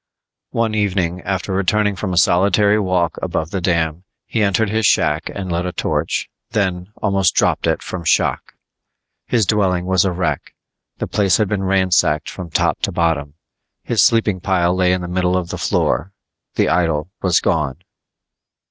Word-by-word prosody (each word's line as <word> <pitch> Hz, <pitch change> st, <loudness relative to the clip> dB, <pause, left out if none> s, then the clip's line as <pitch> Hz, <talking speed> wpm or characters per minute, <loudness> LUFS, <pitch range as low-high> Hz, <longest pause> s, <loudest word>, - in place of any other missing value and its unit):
One 115 Hz, -1 st, -1 dB
evening 95 Hz, -4 st, 0 dB
after 95 Hz, 0 st, -2 dB
returning 100 Hz, +2 st, +1 dB
from 95 Hz, +1 st, -3 dB
a 90 Hz, -, -2 dB
solitary 100 Hz, +4 st, +3 dB
walk 90 Hz, -4 st, 0 dB
above 80 Hz, 0 st, -2 dB
the 95 Hz, -, -2 dB
dam, 85 Hz, -1 st, 0 dB, 0.2 s
he 115 Hz, -, -2 dB
entered 100 Hz, +1 st, +1 dB
his 110 Hz, -1 st, +2 dB
shack 75 Hz, +2 st, +1 dB
and 95 Hz, -3 st, -4 dB
lit 85 Hz, +1 st, -1 dB
a -, -, -3 dB
torch, -, -, -2 dB, 0.3 s
then 95 Hz, -2 st, -1 dB
almost 95 Hz, -3 st, +2 dB
dropped -, -, +1 dB
it -, -, 0 dB
from 90 Hz, -2 st, -6 dB
shock! -, -, 0 dB, 0.7 s
His 115 Hz, -4 st, +2 dB
dwelling 95 Hz, -3 st, +1 dB
was 95 Hz, -1 st, +3 dB
a 95 Hz, -, 0 dB
wreck. 90 Hz, 0 st, -3 dB, 0.4 s
The -, -, -3 dB
place 100 Hz, -3 st, +2 dB
had 110 Hz, -, +1 dB
been 105 Hz, -2 st, -1 dB
ransacked 95 Hz, -5 st, +2 dB
from 90 Hz, -3 st, -8 dB
top -, -, 0 dB
to -, -, 0 dB
bottom. 80 Hz, -4 st, -1 dB, 0.5 s
His -, -, +1 dB
sleeping 110 Hz, -4 st, +3 dB
pile 90 Hz, -2 st, +1 dB
lay 90 Hz, -1 st, +2 dB
in 90 Hz, 0 st, 0 dB
the 90 Hz, -, -5 dB
middle 90 Hz, 0 st, 0 dB
of 90 Hz, -2 st, -3 dB
the -, -, -4 dB
floor 95 Hz, +4 st, 0 dB, 0.4 s
the -, -, +2 dB
idol 80 Hz, -1 st, 0 dB
was 90 Hz, -3 st, +3 dB
gone! 75 Hz, +1 st, -1 dB
90 Hz, 170 wpm, -19 LUFS, 85-100 Hz, 0.7 s, solitary